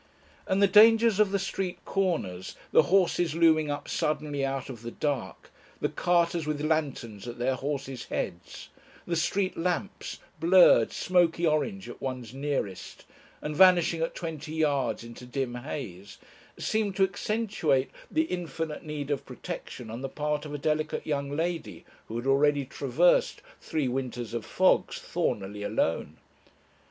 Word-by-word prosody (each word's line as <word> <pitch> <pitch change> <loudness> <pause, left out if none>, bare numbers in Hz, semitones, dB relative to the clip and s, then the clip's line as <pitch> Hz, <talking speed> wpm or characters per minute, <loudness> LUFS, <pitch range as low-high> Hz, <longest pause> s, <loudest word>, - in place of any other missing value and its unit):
And 190 +1 +2
the - - +7
dangers 220 +2 +6
of 210 -2 +5
the 200 - +2
street 195 -1 -3
corners, 155 - -1 0.2
the - - +7
horses 175 -3 +3
looming 160 -2 +4
up 145 0 -4
suddenly 150 -3 -1
out 135 -1 -2
of 120 -4 -8
the 120 - -5
dark, 145 +1 -3 0.3
the - - 0
carters 170 -2 +1
with 150 -1 -1
lanterns 130 -9 -2
at 120 - -6
their 125 +2 +1
horses' 135 -2 -4
heads, 85 -2 -5 0.4
the 170 - -1
street 185 +4 0
lamps, 180 +3 -3 0.2
blurred, 170 -8 +6
smoky 175 -2 +2
orange 190 +6 0
at - - -10
one's 125 -3 -5
nearest, 135 -10 -4 0.4
and 150 0 -3
vanishing 175 -2 +5
at 165 - -1
twenty 155 -2 -5
yards 145 -7 +1
into 115 +1 -10
dim 130 -1 -2
haze, 120 - -7 0.4
seemed 215 -3 -1
to 195 - +3
accentuate 195 -8 0 0.2
the 315 - +2
infinite 165 - -4
need 150 -2 -4
of 140 - -1
protection 115 -3 -7
on 115 +3 -6
the 135 - -3
part 150 +1 -2
of 150 - -7
a - - -2
delicate 155 +1 -1
young 140 -2 -1
lady 165 +3 -3 0.2
who 110 - -7
had 120 +2 -3
already 140 +1 +3
traversed - - +2 0.2
three 150 -4 -2
winters 125 -3 -3
of 115 -2 -4
fogs, - - +2
thornily 105 +1 -2
alone. 105 -6 -1
150 Hz, 150 wpm, -28 LUFS, 130-175 Hz, 0.4 s, the